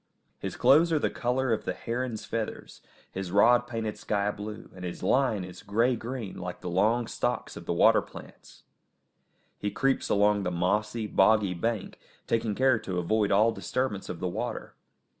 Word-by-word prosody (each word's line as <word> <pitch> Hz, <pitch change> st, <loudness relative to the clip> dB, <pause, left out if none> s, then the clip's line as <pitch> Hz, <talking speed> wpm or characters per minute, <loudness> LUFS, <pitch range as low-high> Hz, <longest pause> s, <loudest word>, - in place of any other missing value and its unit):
His -, -, -5 dB
clothes 160 Hz, +5 st, +5 dB
are 160 Hz, -, +3 dB
the -, -, 0 dB
colour 125 Hz, 0 st, 0 dB
of 110 Hz, -, -2 dB
the 90 Hz, -, -3 dB
heron's 120 Hz, 0 st, -4 dB
feathers, 115 Hz, -2 st, -5 dB, 0.3 s
his 95 Hz, -1 st, -5 dB
rod 120 Hz, +5 st, +5 dB
painted 115 Hz, -3 st, -4 dB
sky 100 Hz, 0 st, 0 dB
blue, 105 Hz, +1 st, -8 dB
and 90 Hz, -, -10 dB
his 90 Hz, -1 st, -6 dB
line 125 Hz, -7 st, +2 dB
is 90 Hz, -1 st, -10 dB
grey 115 Hz, +5 st, +1 dB
green 115 Hz, -4 st, -6 dB
like 90 Hz, 0 st, -6 dB
the 90 Hz, -, -4 dB
long 110 Hz, +6 st, +2 dB
stalks -, -, -3 dB
of -, -, -10 dB
the -, -, 0 dB
water -, -, +5 dB
plants. -, -, -14 dB, 1.0 s
He 105 Hz, -, -1 dB
creeps 135 Hz, +6 st, 0 dB
along 105 Hz, 0 st, +3 dB
the 95 Hz, -, -1 dB
mossy, 105 Hz, +6 st, 0 dB
boggy 105 Hz, -1 st, +3 dB
bank, 110 Hz, +4 st, -3 dB, 0.3 s
taking 115 Hz, -2 st, 0 dB
care 130 Hz, -2 st, +3 dB
to 95 Hz, -3 st, -4 dB
avoid 105 Hz, +4 st, +1 dB
all 110 Hz, +3 st, +4 dB
disturbance 115 Hz, -2 st, -3 dB
of 85 Hz, -, -5 dB
the 90 Hz, -, -2 dB
water. 90 Hz, -, -4 dB
105 Hz, 175 wpm, -28 LUFS, 95-120 Hz, 1.0 s, clothes